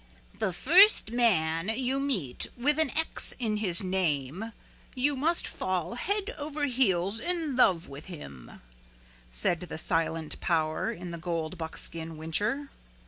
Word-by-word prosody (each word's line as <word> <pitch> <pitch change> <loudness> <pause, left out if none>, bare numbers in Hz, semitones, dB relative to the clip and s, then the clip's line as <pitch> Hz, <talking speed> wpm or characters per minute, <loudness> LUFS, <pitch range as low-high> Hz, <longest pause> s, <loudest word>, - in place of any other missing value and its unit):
"The - - 0
first 350 - +5
man 185 -7 +1
you 260 +4 0
meet 205 - -1
with 290 +5 +3
an 315 -3 +2
X 320 - +2
in 220 -4 -1
his 190 -4 +2
name 180 - -2 0.4
you 275 +3 +1
must 320 +6 +1
fall 180 -2 -2
head 405 - -2
over 295 0 -2
heels 215 -6 +1
in 325 -1 0
love 185 -9 +3
with 140 +2 -9
him," 70 - -11 0.7
said - - +1
the 180 - -7
silent 165 -1 0
power 155 -3 0
in 175 0 -8
the 170 - -7
gold 165 0 -4
buckskin 160 0 -4
whincher. 210 - -2
190 Hz, 140 wpm, -28 LUFS, 165-265 Hz, 0.7 s, first